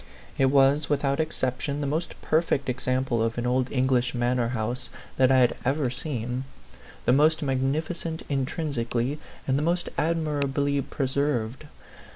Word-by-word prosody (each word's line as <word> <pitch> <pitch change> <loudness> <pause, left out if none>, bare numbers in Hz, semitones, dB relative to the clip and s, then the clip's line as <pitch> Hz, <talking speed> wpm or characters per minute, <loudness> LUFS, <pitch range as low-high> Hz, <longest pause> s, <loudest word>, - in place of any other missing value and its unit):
It 135 - +3
was, 140 +2 +4
without 140 0 +1
ex 155 0 -1
ception, 130 +3 -1
the 145 - -2
most 155 +5 -2
perfect 155 -4 +1
example 130 -1 0
of 115 +1 0
an 120 - -1
old 125 +1 +1
English 130 -1 +1
manor 120 0 +1
house 120 +1 -3 0.3
that 130 0 +5
I 130 - +5
had 120 - +3
ever 135 -1 +1
seen; 125 -2 -3 0.6
the 120 - +4
most 155 +3 +4
magnificent 155 +5 -1
intrinsically, 135 -2 -1 0.3
and 135 +1 +2
the - - -1
most 170 +3 0
admirably 145 -3 0
preserved. 135 -2 -1
135 Hz, 145 wpm, -26 LUFS, 125-150 Hz, 0.6 s, that